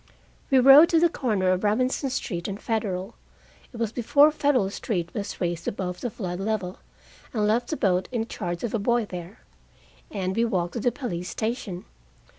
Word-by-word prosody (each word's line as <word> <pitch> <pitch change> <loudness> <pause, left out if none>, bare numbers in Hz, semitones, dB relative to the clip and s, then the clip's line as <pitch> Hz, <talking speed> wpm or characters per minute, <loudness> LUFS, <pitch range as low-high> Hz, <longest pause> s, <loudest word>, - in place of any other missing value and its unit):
We 270 - +4
rowed 275 +6 +8
to 330 - +4
the 340 +1 +4
corner 205 - 0
of 185 +1 0
Robinson 255 +6 +1
Street 180 -9 -3
and 200 0 -5
Federal 205 -3 -2 0.6
it 240 - -10
was 230 -2 -1
before 280 +6 +4
Federal 280 -10 +1
Street 175 -6 -3
was 200 -2 -5
raised 170 -2 -2
above 180 -2 -3
the 245 - -2
flood 185 -5 -5
level 195 -3 -2 0.6
and 210 -2 +1
left 230 +3 +1
the 310 - -3
boat 185 -2 +1
in 230 -3 -1
charge 175 -5 -5
of 235 - -2
a 225 - +1
boy 235 +2 +1
there. 180 0 -9 0.7
And 190 -2 -3
we 230 - +2
walked 180 -6 -1
to - - -3
the 245 +2 +1
police 180 -11 -5
station. 215 -5 -4
215 Hz, 185 wpm, -25 LUFS, 185-245 Hz, 0.7 s, rowed